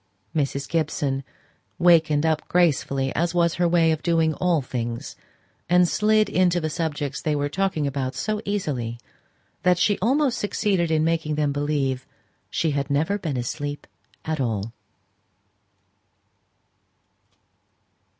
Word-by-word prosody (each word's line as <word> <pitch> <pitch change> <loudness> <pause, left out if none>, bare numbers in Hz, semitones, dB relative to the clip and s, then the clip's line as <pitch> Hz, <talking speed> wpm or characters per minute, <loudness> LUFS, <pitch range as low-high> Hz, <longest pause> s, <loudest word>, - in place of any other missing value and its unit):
Mrs. 140 -1 -1
Gibson 145 -4 -1 0.5
wakened 160 -4 +4
up 160 -1 0
gracefully, 140 -6 +1
as 170 +1 0
was 170 -1 +3
her 175 - +4
way 165 -1 +3
of 155 - -1
doing 165 -2 +2
all 175 0 +1
things, 120 -2 -4 0.5
and 180 0 +5
slid 215 +2 +3
into 180 -3 +2
the 155 -2 -3
subjects 145 -3 -3
they 155 -1 0
were 145 0 -1
talking 185 -2 0
about 135 -2 -2
so 215 0 -2
easily, 140 - -2 0.6
that 180 -1 +3
she 205 +3 +2
almost 260 +4 +2
succeeded 200 -4 0
in 155 -1 +2
making 160 -2 0
them 150 -1 +1
believe 140 -3 -1 0.4
she 160 - 0
had 140 0 -2
never 160 +8 +1
been 155 -8 -3
asleep 145 +4 -4 0.4
at 155 -2 -2
all. 110 -2 -2
155 Hz, 130 wpm, -24 LUFS, 140-175 Hz, 0.6 s, and